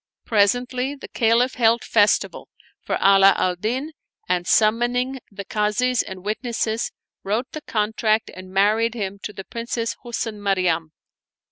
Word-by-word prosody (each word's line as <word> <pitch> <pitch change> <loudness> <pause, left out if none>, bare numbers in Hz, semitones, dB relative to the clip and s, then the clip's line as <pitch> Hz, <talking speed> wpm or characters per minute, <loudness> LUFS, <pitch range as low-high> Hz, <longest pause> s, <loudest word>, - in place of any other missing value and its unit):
Presently 245 +5 +1
the 275 - -10
Caliph 235 +2 +2
held 230 -1 +3
festival 210 -2 +1 0.3
for - - -2
Ala 195 0 +6
al 180 -1 +1
Din 250 - -3 0.4
and, 180 0 0
summoning 240 +4 +2
the 200 -1 -8
Kazis 220 +5 +1
and 190 0 -9
witnesses, 225 0 -2 0.3
wrote 220 +6 -2
the 310 - -6
contract 215 -1 0
and 185 0 -10
married 215 +4 +2
him 200 -3 -4
to - - -5
the 195 - -8
Princess 230 +1 -3
Husn 225 -3 -4
Maryam. 180 -5 0
220 Hz, 135 wpm, -22 LUFS, 200-240 Hz, 0.4 s, Ala